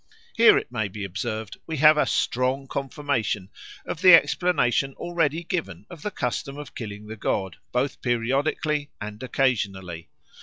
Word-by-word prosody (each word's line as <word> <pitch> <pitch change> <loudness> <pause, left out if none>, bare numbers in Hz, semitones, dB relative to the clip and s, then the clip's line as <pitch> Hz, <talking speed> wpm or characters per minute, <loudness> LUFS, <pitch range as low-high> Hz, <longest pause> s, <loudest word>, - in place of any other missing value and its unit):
Here, 230 0 +7
it - - -3
may 110 -4 -1
be 100 +1 -7
observed, 110 +3 -4
we 160 -1 -3
have 155 +2 +7
a 150 - +2
strong 130 +2 0
confirmation 135 -8 -2 0.3
of 165 - -5
the 185 -2 +10
explanation 140 -7 +2
already 170 -2 -1
given 175 -1 -4
of 170 -4 -10
the 210 - -2
custom 140 - -3
of 150 - -9
killing 105 -2 -7
the 110 +1 -7
god, 95 -3 -2
both 125 +2 -1
periodically 140 +5 0
and 105 0 -7
occasionally. 95 -10 -1
130 Hz, 150 wpm, -25 LUFS, 110-150 Hz, 0.3 s, the